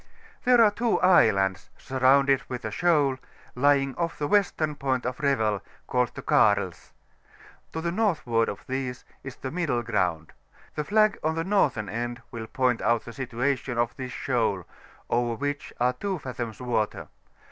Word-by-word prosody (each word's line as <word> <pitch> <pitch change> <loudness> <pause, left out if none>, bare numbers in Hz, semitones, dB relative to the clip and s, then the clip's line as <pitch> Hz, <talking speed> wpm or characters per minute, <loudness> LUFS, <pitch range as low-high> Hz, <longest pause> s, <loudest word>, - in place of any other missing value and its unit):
There 245 -2 +6
are 210 - +5
two 230 +2 +1
islands^ 100 - +4
surrounded 135 +1 +3
with 125 -1 -5
a - - -3
shoaly 150 -7 +2 0.3
lying 135 +1 +2
off 170 -1 -2
the 145 - -2
western 170 -5 +1
point 135 -3 -2
of 125 0 -3
Revel, 110 -9 +1 0.2
called 125 -1 0
the - - -7
Karls: 100 -5 +2 0.8
to 160 - -4
the 170 +1 -1
northward 155 - +1
of - - -7
these 130 -1 -4 0.2
is 135 -2 -7
the 130 - -6
mi&le 145 -8 -1
GrouTid; 90 -8 -1 0.4
the 150 - -2
flag 215 +3 +3
on 160 +1 0
the 165 - -1
northern 150 - +1
end 120 +3 -4
will 110 -1 -6
point 125 0 0
out 115 -1 +1
the 120 - -8
situation 125 +1 -2
of 120 0 0
this 130 -1 -6
sTioal^ 110 -10 -1 0.4
over 120 -1 0
which 145 +3 -4
are 125 +1 +2
2 195 +3 -3
fathoms 120 -6 -6
water. 115 -4 -2
130 Hz, 160 wpm, -26 LUFS, 115-150 Hz, 0.8 s, There